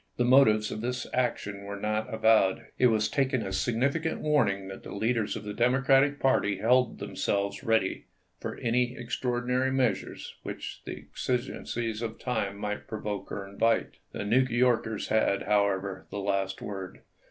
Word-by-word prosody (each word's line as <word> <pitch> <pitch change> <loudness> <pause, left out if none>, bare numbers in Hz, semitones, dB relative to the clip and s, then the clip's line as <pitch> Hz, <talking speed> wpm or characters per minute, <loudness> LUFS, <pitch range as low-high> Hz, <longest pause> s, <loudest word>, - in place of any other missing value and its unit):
The 120 - +2
motives 110 -5 +5
of 110 - -4
this 125 +1 -2
action 105 -5 -1
were 100 0 -6
not 110 +1 -1
avowed. 110 -4 +3
It 125 - +6
was 110 -2 +2
taken 130 -3 0
as 95 0 -3
a - - +1
significant 140 +7 0
warning 105 -11 +1
'chat 95 0 -8
the - - -8
leaders 115 +1 0
of - - -6
the 105 0 -5
Democratic 135 +4 +3
party 105 -7 +2
held 125 +5 +3
them - - -7
selves 100 +5 -1
ready 110 -5 +1 0.3
for - - -5
any 125 +1 0
extraordinary 125 +1 -1
measures 125 -7 -1
which - - -6
the - - -5 0.2
exigencies 120 -2 -2
of 115 -1 -4
the - - -18
time 110 -6 -1
might 105 0 -4
provoke 105 -2 -5
or 100 -1 -5
invite. 115 +4 0
The - - -4
New 115 +5 +4
Yorkers 120 -3 +1
had, 110 -2 +2
however, 100 -2 0
the - - -6
last 100 -1 -1
word. 95 -2 -7
110 Hz, 165 wpm, -28 LUFS, 100-125 Hz, 0.3 s, It